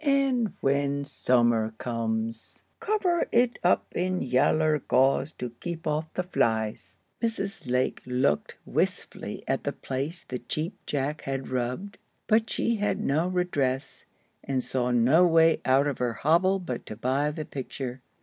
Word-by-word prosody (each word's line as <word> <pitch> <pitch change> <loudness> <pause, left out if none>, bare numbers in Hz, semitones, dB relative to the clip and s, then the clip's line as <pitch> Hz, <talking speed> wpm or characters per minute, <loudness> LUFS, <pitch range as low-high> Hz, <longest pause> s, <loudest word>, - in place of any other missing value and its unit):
And 275 -6 +2
when 140 +1 +1
summer 120 -5 +2
comes, 115 -1 -3 0.2
cover 415 -6 +1
it 240 0 +3
up 180 - +3
in 185 +1 0
yaller 150 +4 +3
gauze 135 +4 +2
to 125 -1 -5
keep 170 -1 -5
off 155 +1 -1
the 180 - 0
flies." 110 - -1 0.2
Mrs. 220 - -3
Lake 125 +1 +1
looked 125 - +1
wistfully - - -2
at - - 0
the - - -1
place 140 +6 -4
the 125 - -5
Cheap 160 +5 -3
Jack 145 +1 -1
had 135 -1 -4
rubbed, 130 +11 -3 0.3
but 220 +1 +3
she 230 -1 0
had 205 0 0
no 155 +5 +1
redress, 145 -8 -1 0.4
and 130 -2 -1
saw 125 -1 -1
no 125 +8 +5
way 165 -1 +4
out 135 +2 +4
of 145 -3 -2
her 120 -2 0
hobble 170 +9 +3
but 130 -11 -5
to 110 - -6
buy 130 +6 0
the 150 0 -5
picture. 130 -2 -6
140 Hz, 150 wpm, -27 LUFS, 125-180 Hz, 0.4 s, no